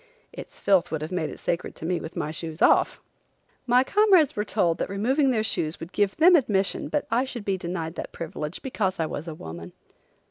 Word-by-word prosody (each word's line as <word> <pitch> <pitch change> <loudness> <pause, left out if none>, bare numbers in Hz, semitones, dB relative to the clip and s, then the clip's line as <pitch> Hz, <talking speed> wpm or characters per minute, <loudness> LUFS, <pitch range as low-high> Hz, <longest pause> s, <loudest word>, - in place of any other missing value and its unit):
Its - - -10
filth 195 -3 +3
would 155 -1 -3
have 155 - -6
made 175 -4 -1
it - - -9
sacred 170 - -3
to - - -8
me 175 0 0
with 160 +1 -8
my 150 - -2
shoes 160 +1 -6
off! - - +4 0.7
My 250 +1 +5
comrades 385 -3 +4
were 210 - 0
told 180 -6 0
that - - -2
removing 260 +9 +1
their 225 -4 +1
shoes 160 -6 -1
would 165 +2 -8
give 205 -1 +1
them 350 +3 +7
admission 205 - +1
but 295 - -1
I 240 +3 +3
should 245 -5 -6
be 195 - +1
denied 170 -3 -4
that - - -5
privilege 155 0 -6
because 200 -9 -2
I 160 - +1
was 155 +1 -5
a 160 - -5
woman. 85 - -9
190 Hz, 215 wpm, -25 LUFS, 160-245 Hz, 0.7 s, them